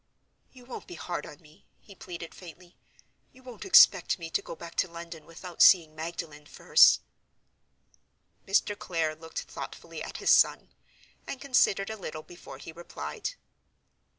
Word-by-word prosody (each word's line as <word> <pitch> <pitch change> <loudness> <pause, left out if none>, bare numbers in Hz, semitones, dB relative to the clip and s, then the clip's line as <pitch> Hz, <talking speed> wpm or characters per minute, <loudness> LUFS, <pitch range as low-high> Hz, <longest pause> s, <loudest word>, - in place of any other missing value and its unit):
"You 250 -2 -16
won't 255 - -9
be 175 - -9
hard 170 -2 -5
on 150 - -12
me?" 155 +3 -22
he 200 - -16
pleaded, 170 -3 -9
faintly. 175 0 -14 0.6
"You 260 - -20
won't 250 - -10
expect 485 - +6
me 165 -2 -8
to - - 0
go - - -8
back 170 +1 -10
to - - +2
London 170 -1 -10
without 170 +1 -8
seeing 165 -5 +7
Magdalen 155 -2 -7
first?" - - +5 1.5
Mr. 200 +1 +2
Clare 165 -5 -2
looked 160 +1 -7
thoughtfully - - -9
at - - -6
his - - +2
son, - - +3 0.5
and 270 - -5
considered 220 -7 +2
a 220 - -6
little 155 -5 -7
before 175 - -12
he - - -10
replied. 75 - -7
170 Hz, 150 wpm, -28 LUFS, 160-195 Hz, 1.5 s, seeing